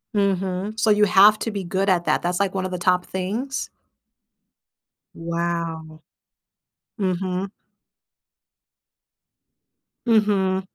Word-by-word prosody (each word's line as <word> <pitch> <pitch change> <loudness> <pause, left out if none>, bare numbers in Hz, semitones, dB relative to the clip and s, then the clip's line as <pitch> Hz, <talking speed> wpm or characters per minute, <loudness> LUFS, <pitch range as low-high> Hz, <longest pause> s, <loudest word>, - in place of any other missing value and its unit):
Mhm. 195 +1 -1
So, 220 0 +2
you 210 0 +5
have 205 +2 +6
to 225 - -3
be 200 -2 -4
good 190 +3 -1
at 175 -2 +2
that, - - +1
that's 175 +1 -1
like 195 -1 0
one 190 -1 -2
of 185 - -4
the 180 - -3
top 180 0 +1
things. 220 +9 -4 1.5
Wow. 165 -2 -4 0.9
Mhm. 185 0 -2 2.6
Mhm. 200 -4 +2
190 Hz, 105 wpm, -22 LUFS, 180-205 Hz, 2.6 s, have